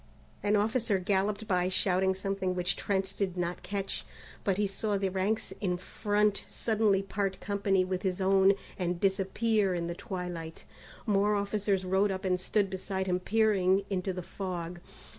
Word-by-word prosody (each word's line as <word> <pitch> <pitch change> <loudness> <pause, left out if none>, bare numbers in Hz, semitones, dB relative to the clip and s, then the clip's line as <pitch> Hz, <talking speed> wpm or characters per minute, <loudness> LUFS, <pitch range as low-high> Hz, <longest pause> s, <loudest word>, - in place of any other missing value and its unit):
An 205 +1 +2
officer 215 0 +2
galloped 200 +3 0
by 180 -2 +2
shouting 190 0 +2
something 190 -1 -2
which 180 0 0
Trent 195 -1 -1
did 185 -3 -1
not 175 0 -2
catch, 195 0 -3 0.4
but 195 -3 +1
he 205 - +2
saw 200 +1 -1
the 195 -1 0
ranks 195 +4 -1
in 180 -3 0
front 205 +2 0
suddenly 215 -3 +1
part 195 -1 -2
company 195 -2 +1
with 185 0 -2
his 190 -2 -1
own, 195 +1 +5 0.3
and 175 -1 -1
disappear 195 +1 +1
in 170 -1 -2
the 170 - -3
twilight. 175 -5 -6 0.4
More 205 -1 +3
officers 200 -1 0
rode 190 +2 +2
up 190 0 -3
and 180 -1 +2
stood 200 +2 +1
beside 190 0 -3
him 180 -1 +1
peering 200 -2 +2
into 190 0 0
the 180 -1 -5
fog. 175 -2 -5
195 Hz, 160 wpm, -30 LUFS, 185-205 Hz, 0.4 s, own